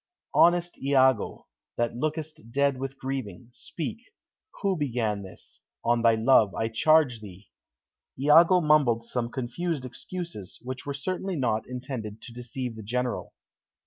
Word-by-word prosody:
"Honest 175 0 +3
Iago, 130 -4 +2 0.3
that 120 0 0
lookest 155 -3 -4
dead 140 0 +1
with 135 0 -5
grieving, 125 -6 -5
speak: 175 - -5 0.6
who 195 -1 +2
began 120 - -1
this? 95 -1 -11 0.2
On 120 0 +3
thy 115 -1 +5
love, 110 -3 +4
I 110 - -1
charge 150 0 +3
thee." 100 -1 -12 0.7
Iago 165 +6 +6
mumbled 145 -7 +3
some 120 0 -2
confused 130 +4 -3
excuses, 170 - -6
which 130 +2 -6
were 140 - -2
certainly 185 +5 -3
not 115 -6 0
intended 125 -4 -6
to 120 - -9
deceive 125 0 -5
the 110 - -8
General. 125 +4 -3
130 Hz, 135 wpm, -27 LUFS, 115-150 Hz, 0.7 s, Iago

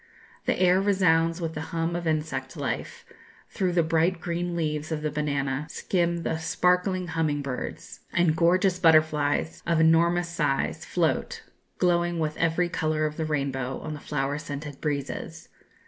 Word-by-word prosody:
The - - +1
air 185 +1 +4
resounds 165 -4 +3
with 165 -2 -3
the 155 - -4
hum 165 +1 -2
of 170 -1 -3
insect 155 0 -2
life; - - -4 0.5
through 185 -4 0
the 170 -1 +3
bright 165 +2 +1
green 175 +1 -2
leaves 155 -1 -2
of 155 -1 -2
the 150 - -1
banana 140 -1 -1
skim 170 -1 -1
the 160 - -1
sparkling 180 +2 +1
humming 155 -3 0
birds, 130 -2 -6
and 175 -2 +2
gorgeous 180 +2 +3
butterflies 155 -1 +3
of 170 -1 +2
enormous 170 +2 +4
size 150 -5 -1
float, - - -1 0.3
glowing 175 -1 +2
with 155 -2 -1
every 165 +2 +1
colour 155 -2 0
of 150 0 -2
the 160 - -2
rainbow, 135 -4 -2
on 155 - -5
the 150 - -7
flower 140 0 -2
scented 145 -2 -7
breezes. 140 -3 -4
160 Hz, 155 wpm, -26 LUFS, 150-175 Hz, 0.5 s, air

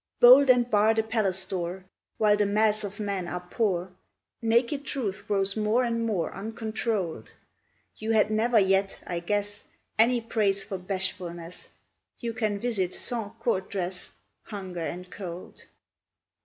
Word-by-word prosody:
Bolt 260 +3 +9
and 245 -1 +5
bar 215 0 +4
the 220 - +2
palace 210 -4 0
door; 180 0 -4 0.3
While 210 -1 +4
the 205 -1 +1
mass 215 +1 +2
of 205 +1 -6
men 200 -4 -2
are 180 0 -5
poor, 190 -5 0 0.5
Naked 235 +5 +2
truth 205 -9 -3
grows 195 -1 +1
more 215 +3 +2
and 230 -1 0
more 195 -7 -1
Uncontrolled; 215 -3 -3 0.7
You 220 - -5
had 215 -1 +3
never 225 +2 +2
yet, 195 -1 +3
I 175 -1 -3
guess, 205 +3 -2 0.4
Any 240 +2 +5
praise 210 -4 0
for 190 - -5
bashfulness, 180 -2 -4 0.5
You 235 -2 -4
can 215 -3 -1
visit 200 -6 -1
sans 225 -4 -1
court 190 0 -1
dress, 185 -2 -4 0.4
Hunger 190 -4 -6
and 180 +2 -5
Cold! 180 -2 -8
205 Hz, 140 wpm, -27 LUFS, 190-225 Hz, 0.7 s, Bolt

